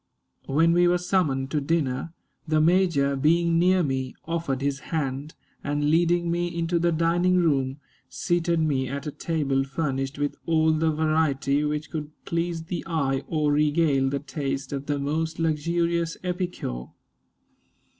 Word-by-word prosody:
When 165 +5 +3
we 175 0 +4
were 175 0 +3
summoned 155 -8 0
to 150 - 0
dinner, 140 -1 -1 0.4
the 155 0 +2
major, 160 -4 +3
being 165 +4 +3
near 180 +1 +4
me, 130 -3 -2
offered 165 -5 -2
his 140 -1 -1
hand, 145 -1 -3 0.3
and, 145 +1 0
leading 170 +1 +2
me 175 +1 0
into 170 0 -1
the 170 +1 +2
dining 170 +3 +2
room, 140 -6 +1 0.3
seated 170 -1 0
me 140 -4 +1
at 140 +3 -5
a 150 - -3
table 140 -4 -1
furnished 135 -1 -3
with 145 0 -2
all 160 -1 +3
the 160 +1 +2
variety 155 -2 +1
which 150 0 -2
could 150 -2 -4 0.2
please 170 0 -2
the 175 +2 -4
eye 140 -5 0
or 155 -2 +1
regale 145 -2 +2
the 140 - -1
taste 140 -1 -4
of 140 0 -4
the 145 -1 0
most 155 +3 -2
luxurious 170 +1 0
epicure. 175 - -3
155 Hz, 150 wpm, -25 LUFS, 140-170 Hz, 0.4 s, we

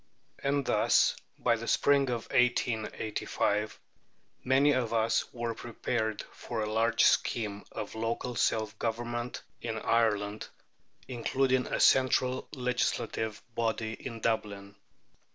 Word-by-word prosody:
And 140 0 0
thus, - - +3 0.2
by 115 -1 +2
the 115 +1 -7
spring 140 -2 +3
of 120 -2 -2
1885, 110 -3 0 0.6
many 135 +3 +4
of 125 -4 0
us 115 +4 +1
were 120 -3 -3
prepared 110 -1 -3
for 115 -2 -5
a 105 - -3
large 115 +1 +3
scheme 105 -3 +1
of 105 -2 -6
local 115 +2 -2
self 110 -2 0
government 120 +1 -3 0.2
in 110 -1 -3
Ireland, 105 -2 +1 0.6
including 130 +1 +1
a - - -2
central 130 -1 +3
legislative 120 -4 -2
body 115 -1 -1
in 115 -1 -7
Dublin. 100 -3 -2
115 Hz, 115 wpm, -30 LUFS, 110-125 Hz, 0.6 s, many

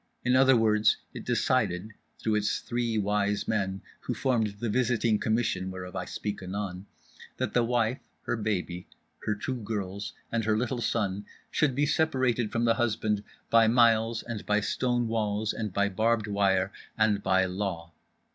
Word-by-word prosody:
In 125 +1 +3
other 130 -1 +6
words, 110 -1 +3 0.2
it - - -7
decided 90 +5 +1 0.3
(through 110 - -1
its 105 0 +1
Three 120 -2 -1
Wise 105 0 0
Men, 95 -3 -1 0.2
who - - -4
formed 115 -6 0
the 120 - -2
visiting 115 -2 +2
Commission 110 -5 0
whereof 90 -1 -7
I - - -3
speak 105 -1 -4
anon) 95 0 -5 0.5
that - - -2
the 120 - +3
wife, 120 +1 +1 0.2
her - - -1
baby, 95 -5 -2 0.4
her 105 - +2
two 130 +5 -3
girls, 100 -2 -4 0.2
and 115 -1 0
her 110 0 +2
little 120 +1 -1
son 100 -3 -1 0.2
should 140 -5 +2
be 145 +2 +2
separated 130 -7 +1
from 115 0 0
the 115 - +5
husband 105 -2 0 0.3
by 115 -1 +6
miles 115 -1 +3
and 115 -4 -5
by 105 0 +2
stone 120 +2 0
walls 110 -1 0
and 110 -3 -3
by 100 +2 +2
barbed 110 +3 +1
wire 100 -2 +1 0.3
and 105 -2 +3
by 95 -1 +3
Law. 90 -3 -4
110 Hz, 165 wpm, -28 LUFS, 100-115 Hz, 0.5 s, other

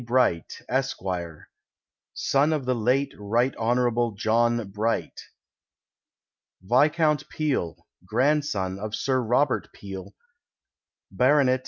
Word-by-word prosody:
Bright, 120 -9 0
Esq., 135 +1 -1 1.2
son 145 +3 +2
of 145 -4 -2
the 130 - +1
late 125 +4 +1
Rt. 115 +6 +1
Hon. 120 -1 +1
John 115 0 +1
Bright. 110 +3 -2 1.4
Viscount 150 - +2
Peel, 140 - -1 0.3
grandson 110 -4 0
of 105 +1 -4
Sir 130 -1 0
Robert 125 +4 +1
Peel, 100 0 -9 1.0
Bt. 130 +1 +4
120 Hz, 90 wpm, -25 LUFS, 110-135 Hz, 1.4 s, Bt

